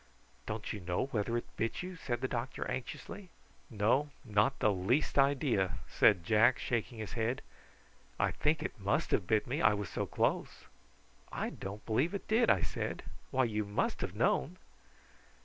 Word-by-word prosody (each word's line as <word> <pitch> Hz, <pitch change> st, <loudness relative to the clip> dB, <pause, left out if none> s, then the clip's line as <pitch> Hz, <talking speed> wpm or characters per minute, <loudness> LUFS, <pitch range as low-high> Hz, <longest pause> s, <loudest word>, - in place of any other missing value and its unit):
"Don't 105 Hz, 0 st, -3 dB
you 105 Hz, -, -5 dB
know 90 Hz, +4 st, -1 dB
whether 115 Hz, +2 st, 0 dB
it 120 Hz, -, -3 dB
bit 115 Hz, +9 st, -1 dB
you?" 185 Hz, 0 st, -6 dB
said 125 Hz, -8 st, -3 dB
the 130 Hz, -, 0 dB
doctor 125 Hz, +1 st, -3 dB
anxiously. 130 Hz, +9 st, -6 dB, 0.4 s
"No, 120 Hz, +6 st, +2 dB, 0.2 s
not 110 Hz, +5 st, +2 dB
the 105 Hz, -, +3 dB
least 110 Hz, +11 st, +1 dB
idea," 135 Hz, -, +2 dB
said 100 Hz, -6 st, +4 dB
Jack, 115 Hz, +6 st, +4 dB
shaking 120 Hz, 0 st, -2 dB
his 110 Hz, -2 st, -5 dB
head. 120 Hz, +3 st, -1 dB, 0.8 s
"I -, -, +2 dB
think 155 Hz, 0 st, +1 dB
it 125 Hz, -, -5 dB
must 100 Hz, +1 st, 0 dB
have 90 Hz, -, +1 dB
bit 110 Hz, +1 st, +2 dB
me, 145 Hz, +7 st, -2 dB
I 105 Hz, -, +5 dB
was 105 Hz, -2 st, -4 dB
so -, -, -2 dB
close." -, -, -1 dB, 0.7 s
"I -, -, -2 dB
don't 100 Hz, +2 st, -7 dB
believe 135 Hz, -, +1 dB
it 200 Hz, -, -6 dB
did," 230 Hz, +2 st, +3 dB
I 95 Hz, -, +4 dB
said. -, -, -3 dB, 0.3 s
"Why, 130 Hz, -, +2 dB
you 110 Hz, -3 st, 0 dB
must 100 Hz, 0 st, -1 dB
have -, -, -3 dB
known." -, -, +1 dB
115 Hz, 170 wpm, -33 LUFS, 105-135 Hz, 0.8 s, I